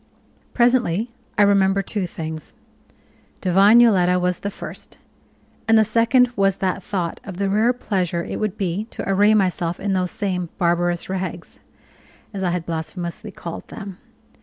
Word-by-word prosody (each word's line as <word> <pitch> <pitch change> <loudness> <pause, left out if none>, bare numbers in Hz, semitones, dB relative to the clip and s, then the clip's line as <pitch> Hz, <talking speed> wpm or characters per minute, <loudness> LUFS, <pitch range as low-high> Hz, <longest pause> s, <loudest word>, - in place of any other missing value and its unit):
Presently 240 -3 +2 0.3
I 210 - +6
remembered 195 -1 +3
two 200 -3 -2
things 160 -2 -6 0.8
divine 195 +5 +5
Yoletta 180 -6 +4
was 180 0 0
the 200 - -3
first; - - -9 0.7
and 225 0 +5
the 220 - +5
second 235 +3 +3
was 195 -1 +2
that 190 0 -1
thought 180 -3 -3
of 190 -3 -8
the 200 0 0
rare 220 +4 +3
pleasure 185 -8 -2
it - - -5
would 215 -1 -2
be 195 +1 -2
to 230 - -7
array 205 +2 +4
myself 180 -4 0
in 200 0 -1
those 185 -1 0
same 185 -5 -3
"barbarous 175 -1 0
rags," 185 -2 -5 0.7
as 195 - -4
I 185 - +1
had 175 -1 -2
blasphemously 170 +5 -5
called 170 -3 -8
them. 200 -3 -9
190 Hz, 155 wpm, -21 LUFS, 175-210 Hz, 0.8 s, I